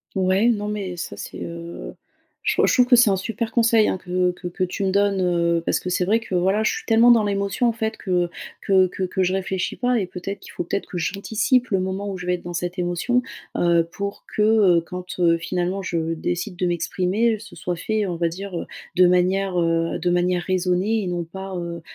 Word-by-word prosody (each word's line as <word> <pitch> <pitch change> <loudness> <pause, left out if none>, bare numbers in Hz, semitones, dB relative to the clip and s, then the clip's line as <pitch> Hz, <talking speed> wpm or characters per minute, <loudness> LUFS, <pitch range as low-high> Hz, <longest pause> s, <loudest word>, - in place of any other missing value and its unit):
Ouais, 190 +4 +3
non, 210 -2 -1
mais 200 -4 -4
ça - - -5
c'est, - - -7
heu 170 0 -7 0.5
je - - +2
trou - - +4
je - - +3
trouve 250 -1 +5
que 245 - +6
c'est 240 -2 +6
un 195 - +3
super 225 +3 -3
conseil, 230 -2 +4
hein, - - 0
que 180 0 0
que 180 0 -7
que 180 +1 -2
tu 185 +3 -3
me 190 - +1
donnes, 200 0 +2
heu, 170 -1 +1
parce - - +1
que - - -5
c'est 180 0 +1
vrai 210 +5 +3
que 225 -5 -6
voilà 190 +4 +2
je - - +2
suis - - -5
tellement 230 +2 +5
dans 230 - +4
l'émotion 200 +3 0
en - - +2
fait 220 -1 -3
que 180 -3 0 0.3
que 190 -1 +4
que 185 - -4
que 185 +1 -1
je 185 0 +1
réfléchis 190 -1 -2
pas 245 -1 +1
et 190 - -2
peut-être 185 +2 -6
qu'il - - -12
faut - - -4
peut-être 200 +4 -3
que 180 - -5
j'anticipe 220 - 0
le 195 - +2
moment 190 +2 -3
où 190 - -5
je 180 - -7
vais 180 - +2
être 180 - -5
dans 175 - -6
cette 175 +2 -3
émotion. 175 +8 0 0.3
Heu, 170 -1 +3
pour 200 0 -5
que, 210 - +1
heu, 210 -5 +5
quand, 180 +1 -7
heu, 170 -1 +4
finalement 180 +3 -2
je 165 -3 -2
décide 175 +3 -3
de 180 - 0
m'exprimer, 185 +6 +1
heu, - - -13
ce 225 +2 -12
soit 175 -1 -3
fait 215 +4 -1
on 175 - -3
va 170 0 0
dire, 185 +1 -6
heu, - - -5 0.3
de 180 0 +7
manière 185 +2 +2
de 165 0 +1
manière 175 0 +1
raisonnée 185 +4 0
et - - -4
non 175 -1 -2
pas, 190 +3 -8
heu 170 -1 -5
185 Hz, 240 wpm, -22 LUFS, 175-205 Hz, 0.5 s, de